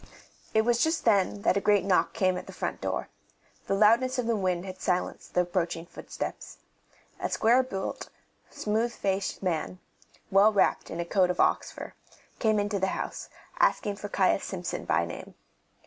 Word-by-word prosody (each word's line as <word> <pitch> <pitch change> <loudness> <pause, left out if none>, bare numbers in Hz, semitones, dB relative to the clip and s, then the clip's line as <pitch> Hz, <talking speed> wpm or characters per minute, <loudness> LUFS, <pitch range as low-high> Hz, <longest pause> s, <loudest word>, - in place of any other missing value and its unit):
It 220 - +5
was 235 0 +2
just 320 +1 0
then 200 -2 +2
that 190 - +3
a - - +1
great 205 -2 +3
knock 190 -2 +2
came 185 -1 +1
at - - -6
the - - -8
front - - -4
door; - - -2 0.6
the 195 - +1
loudness 230 +6 +4
of 250 - 0
the 230 0 +1
wind 185 -3 -1
had 185 -1 -8
silenced 180 -1 -2
the 180 - +5
approaching 175 -2 -2
footsteps. - - -7 0.6
A - - -2
square 240 +4 +4
built, 195 -7 -5 0.4
smooth 220 +3 -1
faced 195 -2 -2
man, 180 0 -2 0.5
well 200 +3 +6
wrapped 200 -2 +1
in 165 - -5
a 170 - -1
coat 185 +1 +2
of 180 - -2
ox - - +2
fur, - - -9 0.5
came 220 -2 +2
into 205 0 0
the 190 - +1
house, - - -5 0.3
asking 205 -1 +2
for 205 - -6
Caius 195 0 +2
Simpson 180 -3 -4
by 85 - +2
name. 85 - -9
195 Hz, 180 wpm, -28 LUFS, 185-220 Hz, 0.6 s, well